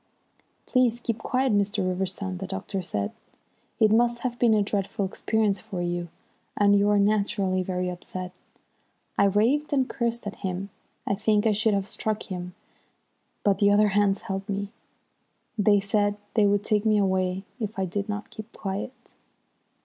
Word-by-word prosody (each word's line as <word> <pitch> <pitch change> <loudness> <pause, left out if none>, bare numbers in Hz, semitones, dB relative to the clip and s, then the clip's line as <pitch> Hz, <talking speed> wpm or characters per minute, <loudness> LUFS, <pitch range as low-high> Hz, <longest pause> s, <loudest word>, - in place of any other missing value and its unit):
"Please 245 -2 +2
keep 230 -2 -3
quiet, 255 +1 +1
Mr. 205 -1 +1
Riverston," 185 0 -2
the 190 - -5
doctor 195 0 -4
said. 105 - -3 0.7
"It 215 -1 +5
must 235 +1 +3
have 245 -2 -3
been 230 -3 +5
a 210 - +3
dreadful 200 +1 -1
experience 205 +1 0
for 210 -5 -6
you, 175 0 -2 0.5
and 205 0 +5
you 200 +1 +3
are 205 - +4
naturally 200 -2 +1
very 180 0 -2
upset." 180 0 -6 0.8
I 200 - +4
raved 235 +10 +2
and 265 -2 +2
cursed 235 -3 -2
at 205 - -5
him. 190 0 -4 0.3
I - - +1
think 210 +1 +2
I 220 - +4
should 215 0 +2
have 195 0 -1
struck 215 +1 -2
him, 180 -2 -6 0.9
but 200 -2 +2
the 200 - +5
others 205 -1 +3
held 195 +1 -5
me. 200 0 -2 0.9
They 205 -1 +4
said 205 +1 +1 0.2
they 215 -3 +4
would 200 0 +2
take 210 -1 +1
me 215 -1 +3
away 190 -1 +1 0.2
if 215 -2 -4
I 190 - 0
did 200 +3 -3
not 205 0 -4
keep 220 +1 -9
quiet. 200 +6 -6
205 Hz, 165 wpm, -26 LUFS, 190-220 Hz, 0.9 s, It